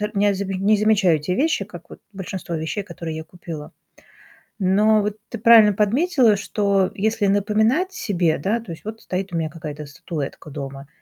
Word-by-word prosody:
э, - - -1
м, 210 - -2
нязибе 200 -1 +1
не 205 +3 +3
замечаю 205 -5 +3
эти 150 +3 -5
вещи, 275 - +1
как 175 -4 -12
вот - - -12
большинство 190 -2 -6
вещей, 160 +6 -3
которые 165 -3 -6
я 160 - -6
купила. 165 -3 -9 0.9
Но 210 +3 +3
вот 210 +1 -3
ты 235 - -6
правильно 220 -2 +7
подметила, 230 - +3
что 200 -2 +1
если 220 +1 0
напоминать 220 - +2
себе, 180 - 0
да 220 +5 0
То 190 - -9
есть 165 - -10
вот 220 +1 -7
стоит 185 0 -4
у - - 0
меня 160 -1 -1
какая-то 150 -2 -7
статуэтка 150 +1 -6
дома, 140 -1 -7
195 Hz, 180 wpm, -22 LUFS, 170-215 Hz, 0.9 s, правильно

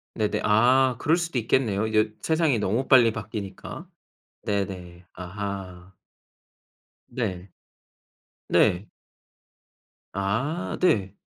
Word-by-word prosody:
네네. 105 -2 -1
아 125 +4 +4
그럴 160 +3 +2
수도 170 -5 -3
있겠네요, 110 -3 +1
이제 110 0 +2
세상이 160 -6 +2
너무 110 +6 -1
빨리 120 -4 +6
바뀌니까. 105 -3 -7 0.6
네네. 90 -3 -4
아하. 95 -1 -7 1.1
네. 100 -7 -4 1.0
네. 90 +4 +3 1.3
아 115 - -2
네. 100 - +2
105 Hz, 170 characters per minute, -25 LUFS, 95-125 Hz, 1.3 s, 빨리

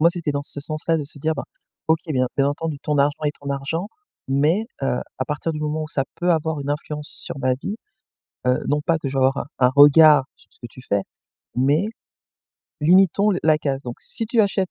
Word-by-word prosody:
Moi, 165 +2 +5
c'était 170 -3 -2
dans 140 0 -2
ce 145 - -2
sens-là, 155 +2 -1
de 150 - -3
se 145 +1 -7
dire: 160 +3 0
«Ben - - -4 0.4
OK, 160 0 +4
bien 130 -5 +1
bien 140 0 +3
entendu, 155 0 -3
ton 150 -1 0
argent 145 +2 +1
est 145 - +1
ton 140 0 -5
argent 140 +7 -3 0.4
mais, 150 +11 +2 0.2
heu, 130 -2 0 0.2
à 130 - -1
partir 150 +3 -3
du 155 - -5
moment 155 +1 -2
où 155 - -6
ça 135 -4 0
peut 175 +1 0
avoir 160 -2 0
une 140 0 -4
influence 150 +1 -3
sur - - -5
ma 130 -1 +2
vie, 170 +10 -5 0.7
heu, 125 - +3
non 150 +1 +1
pas 165 -1 +2
que 145 - -4
je 135 - -6
vais - - +1
avoir 135 +1 +3
un - - -3 0.2
un - - +3
regard 145 0 +8
sur - - -23
ce - - -24
que 120 - -7
tu 130 - -13
fais, 100 -5 0 0.5
mais 145 +9 +2 0.9
limitons 190 +5 +4
le 185 - 0
la 155 -1 +4
casse. 135 -2 -2
Donc 120 -2 -6
si 225 - -3
tu 230 +1 +2
achètes 195 -3 +1
150 Hz, 235 wpm, -22 LUFS, 140-165 Hz, 0.9 s, regard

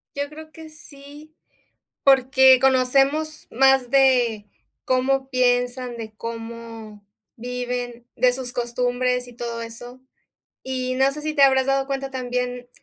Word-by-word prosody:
Yo 285 0 -3
creo 310 +1 -12
que 320 -1 -11
sí, 295 0 -14 0.7
porque 265 -1 +5
conocemos 270 +4 +1
más 265 0 +3
de 245 -5 +3 0.4
cómo 265 +1 0
piensan, 245 -1 0
de 220 -1 -8
cómo 230 -2 -8 0.3
viven, 245 0 -5
de 250 +1 +3
sus 250 -1 -5
costumbres 250 +1 -1
y 245 - -13
todo 235 -1 -5
eso. 245 +2 -10 0.6
Y 255 -1 -3
no 270 +1 +2
sé 300 - -7
sí, 310 0 -3
te 285 - +3
habrás 265 -1 +4
dado 270 0 +1
cuenta 275 0 -4
también, 250 -1 -4
255 Hz, 130 wpm, -22 LUFS, 245-270 Hz, 0.7 s, porque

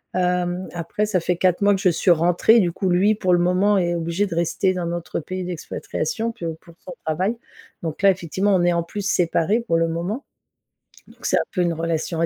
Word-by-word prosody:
Hem, 180 0 0
après 175 +5 -2
ça 210 -3 0
fait 175 +1 -1
4 185 +1 +2
mois 205 0 +5
que - - -4
je 190 - +3
suis 175 +2 +2
rentrée, 175 +7 +4
du 180 -5 +2
coup, 190 - -1
lui 195 +5 +3
pour 185 -3 0
le 175 - +4
moment 185 +4 +3
est 175 -2 +1
obligé 170 +4 -1
de 170 - -5
rester 170 +3 +1
dans 180 -1 -3
notre 170 0 -3
pays 185 +3 -5
d'expatriation. 225 - -3
Puis, 225 -7 -8
heu 165 -1 -4
pour 170 - -16
son 180 - -7
travail 185 +9 -1 0.5
donc 160 +1 -4
là 195 -1 +6
effectivement 190 +3 -1
on 175 - +2
est 175 0 +3
en 170 - 0
plus 200 +4 -6
séparés 180 +5 +1
pour 165 -8 0
le 165 0 +2
moment. 180 - -3 0.8
Donc - - -14
c'est - - +2
un - - +3
peu 180 - -1
une 170 -1 +1
relation 165 0 -2
à - - +3
180 Hz, 230 wpm, -22 LUFS, 170-195 Hz, 0.8 s, là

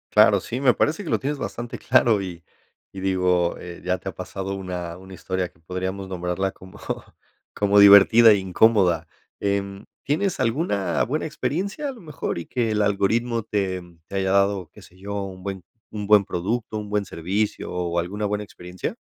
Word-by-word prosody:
Claro, 105 -1 +7
sí, 115 +7 -5
me 130 -3 +4
parece 160 +7 0
que 165 - -5
lo - - +2
tienes 145 +2 -3
bastante 120 -2 -5
claro, 110 -4 +3
y 85 -3 -7 0.5
y 95 - -7
digo, 90 -2 +1
eh, 85 -1 -9
ya 90 0 0
te 95 - -7
ha 90 - -6
pasado 95 +2 -5
una 90 -3 -5
una 95 +1 -13
historia 95 0 -3
que 80 - -29
podríamos 95 +3 -4
nombrarla 90 +1 -2
como 95 0 -14 0.7
como 100 0 +3
divertida 100 +3 +8
y 105 - +3
incómoda, 95 -1 +3 0.3
em, 100 0 -2 0.2
¿tienes 180 +7 0
alguna 115 - 0
buena 150 +7 -2
experiencia 195 - -3
a - - -3
lo 245 - -13
mejor 150 - -4
y 85 - -6
que 120 -3 -1
el 105 -1 +1
algoritmo 115 +4 +1
te 95 -4 -2 0.2
te - - -11
haya 95 -1 0
dado, 100 -3 +2
qué - - -15
sé 90 - -18
yo, 100 +1 -5
un 95 -1 -9
buen 95 -2 -5 0.3
un 105 -1 -5
buen 105 -1 +6
producto, 110 +6 -3
un 105 -1 -7
buen 105 -1 0
servicio 95 +4 -2
o 85 -1 -2
alguna 100 +5 -2
buena 105 0 -1
experiencia? 90 -2 -6
100 Hz, 185 wpm, -23 LUFS, 90-110 Hz, 0.7 s, divertida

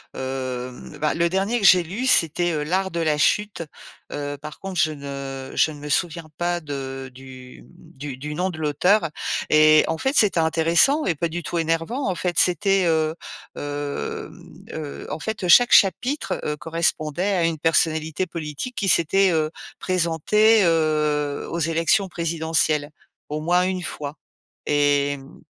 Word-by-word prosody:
hem, 130 -1 -5
bah 150 0 +1
le 170 +1 +1
dernier 195 +6 0
que 195 - 0
j'ai 180 -2 +7
lu, 210 +11 -4
c'était 165 - +2
L'art 190 +3 0
de 170 - -4
la 155 -2 +1
chute. 210 +2 +1 0.5
Heu, 145 0 -4
par 150 0 -9
contre, 190 -3 -5
je 155 -2 +3
ne 140 -2 -7
je - - +3
ne 145 - -10
me 150 - -8
souviens 170 +1 -1
pas 175 0 0
de 135 -3 -6
du, 130 -1 -13
mmh, - - -20
du 140 -2 -6
du 150 +2 -6
nom 185 +3 -1
de 170 - -7
l'auteur 160 +5 +2 0.4
et 155 0 +6
en 160 - -1
fait, 265 +2 -1
c'était 205 -6 +3
intéressant 165 - +3
et 175 - +1
pas 170 - -1
du 170 +1 -5
tout 170 +3 -3
énervant. 165 - -1
En 185 - -1
fait, 175 0 -2
c'était, 190 +1 +2
heu, 160 -1 +1 0.4
hem, 145 0 -6
heu, 150 -2 -7
en 155 - -4
fait, 205 -1 -4
chaque 245 +7 +6
chapitre, 195 - +3
heu, 150 0 -2
correspondait 165 +3 -1
à 175 -2 +2
une 165 -2 -1
personnalité 160 +1 +1
politique 165 - -6
qui 200 - -2
s'était, 185 +3 +3
heu, 155 -1 +1 0.3
présentée, 185 +5 +3
heu, 150 -3 0
aux 170 - -3
élections 165 +5 +1
présidentielles 160 -3 0 0.4
au 150 +1 -3
moins 175 +3 +2
1 185 0 -1
fois, 150 -2 -6 0.5
et 145 -1 +2
mmh 135 0 -15
160 Hz, 165 wpm, -23 LUFS, 150-180 Hz, 0.5 s, j'ai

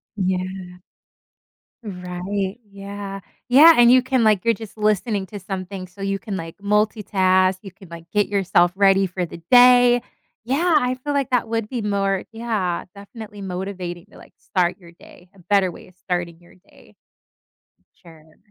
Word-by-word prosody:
Yeah. 185 -1 -4 1.0
Right, 190 +2 -5
yeah 200 0 -8 0.3
yeah, 310 +6 +8
and 240 0 +7
you 255 0 +6
can 260 -2 +1
like, 215 -2 +2
you're 230 - +4
just 220 +1 -11
listening 210 -1 0
to 205 +2 -8
something, 190 0 -6
so, 195 +2 -15
you 195 0 -1
can, 200 -3 -5
like, 165 -1 -7
multitask, 195 -3 +1
you 195 - -9
can, 190 -2 -17
like, 170 0 -11
get 205 -1 +1
yourself 180 -3 +2
ready 195 -1 +4
for 180 0 -3
the 170 0 -11
day. 245 -1 +6 0.4
Yeah, 320 +7 +1
I 250 0 -1
feel 290 - -2
like 275 -2 -1
that 240 -2 +1
would 225 -2 -2
be 240 -2 -4
more, 195 -2 -1
yeah, 220 -6 -3
definitely 205 0 -11
motivating 185 -1 -6
to, - - -16
like, - - -16
start 180 -2 -1
your 170 -2 -16
day, 175 +1 -18
a - - -19
better 190 +1 +1
way - - -12
of 180 - -24
starting 175 -2 -4
your 175 - -21
day. 185 +2 -23 1.1
Sure. 160 -3 -18
195 Hz, 165 wpm, -21 LUFS, 180-220 Hz, 1.1 s, yeah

